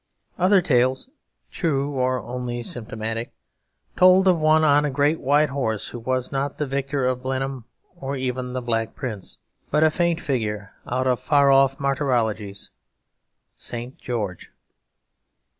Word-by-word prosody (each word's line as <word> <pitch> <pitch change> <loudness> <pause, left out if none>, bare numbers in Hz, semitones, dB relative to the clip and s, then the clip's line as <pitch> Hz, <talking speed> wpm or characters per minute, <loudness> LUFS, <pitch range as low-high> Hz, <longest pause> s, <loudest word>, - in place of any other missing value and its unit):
Other 185 +2 +5
tales, 130 - +1 0.4
true 145 -4 -1
or 130 -1 0
only 120 -1 -4
symptomatic, 115 -1 -3 0.6
told 185 +1 +6
of 180 -3 +4
one 155 0 +4
on 145 -1 +5
a 150 - 0
great 145 +4 +1
white 145 +3 +3
horse 110 -7 -2
who 120 - -7
was 130 +1 -2
not 140 +1 -2
the 150 - -1
victor 135 0 -2
of 125 0 0
Blenheim 130 -1 -3 0.3
or 135 +1 -4
even 130 -1 -3
the 130 -1 -3
Black 115 -1 -1
Prince, 110 -7 -6 0.3
but 150 - +3
a 155 - +5
faint 170 0 +1
figure 105 - -3
out 130 +1 -1
of 125 -2 +2
far 140 -2 +4
off 135 0 +4
martyrologies 120 -8 -1 0.8
St. 120 +2 -6
George. 105 -8 -4
130 Hz, 140 wpm, -23 LUFS, 120-145 Hz, 0.8 s, told